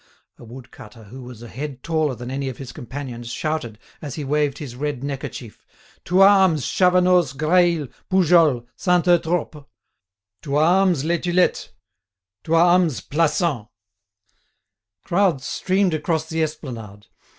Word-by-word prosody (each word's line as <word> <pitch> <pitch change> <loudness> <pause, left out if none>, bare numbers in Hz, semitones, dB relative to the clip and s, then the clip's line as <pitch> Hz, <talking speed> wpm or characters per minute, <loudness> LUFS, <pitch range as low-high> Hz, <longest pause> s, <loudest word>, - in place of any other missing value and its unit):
A - - -13
wood 125 +2 -12
cutter, 110 +2 -14
who 125 +6 -11
was 120 -2 -11
a - - -9
head 135 +2 -7
taller 155 -5 0
than 120 +1 -8
any 135 0 -3
of 130 - -8
his 135 -3 -8
companions, 120 -1 -8
shouted, 145 -6 -3 0.2
as 145 -5 -6
he 150 - -5
waved 145 0 0
his 130 -5 -8
red 140 -1 -4
neckerchief: 135 -5 -7 0.4
"To 180 +2 +2
arms, 190 -7 +5
Chavanoz, 180 -5 +3
Graille, 165 +1 +2 0.2
Poujols, 165 -9 +3
Saint 180 -2 +1
Eutrope! 165 -4 0 0.7
To 140 -1 -4
arms, 175 0 +3
Les 170 +1 0
Tulettes! 180 0 0 0.8
To 165 - +1
arms, 170 - +3
Plassans!" 150 - 0 1.4
Crowds 175 -7 +1
streamed 190 -1 0
across 160 +1 -1
the 160 0 -2
esplanade. 115 -10 -6
150 Hz, 135 wpm, -21 LUFS, 130-175 Hz, 1.4 s, arms